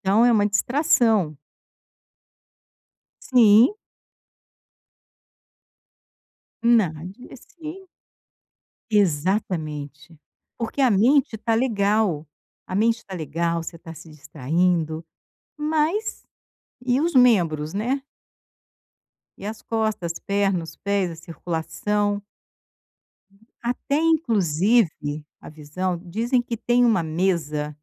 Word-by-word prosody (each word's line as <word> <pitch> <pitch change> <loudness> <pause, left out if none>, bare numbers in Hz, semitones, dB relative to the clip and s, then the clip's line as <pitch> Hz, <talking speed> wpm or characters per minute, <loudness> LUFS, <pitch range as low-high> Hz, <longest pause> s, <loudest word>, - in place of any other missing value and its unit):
Então, 200 +4 +3
é 245 - +5
uma 205 -2 +3
distração. 220 - +2 1.9
Sim. 235 - +6 2.9
Nad 185 -8 +2 0.2
e - - -10
se 335 +7 -11 1.0
Exatamente. 160 -5 -1 0.4
Porque 230 +4 -3
a 260 -3 +4
mente 235 +4 +3
tá 225 +1 0
legal. 210 - +1 0.4
A 185 - -6
mente 225 +3 +1
tá 195 - -9
legal, 165 +1 -2
você 165 0 -8
tá 165 -1 -10
se 165 +1 -13
distraindo, 160 +2 -1 0.5
mas 315 +8 -1 0.6
e 250 +1 +2
os 330 -1 -1
membros, 170 -11 +3
né? 250 +7 -1 1.3
E 200 - -8
as 215 +1 -6
costas, 220 -7 -2
as - - -9
pernas, 195 -4 -1
os 160 - -17
pés, 200 -3 -1
a 165 - -8
circulação? 205 +5 -2 1.4
Até, 250 +4 -1
inclusive 195 - +1 0.2
a - - -11
visão, 160 +4 -4
dizem 230 +8 0
que 240 -1 -4
tem 240 +2 +2
uma 220 -7 +3
mesa 155 -3 -1
200 Hz, 95 wpm, -23 LUFS, 165-235 Hz, 2.9 s, Sim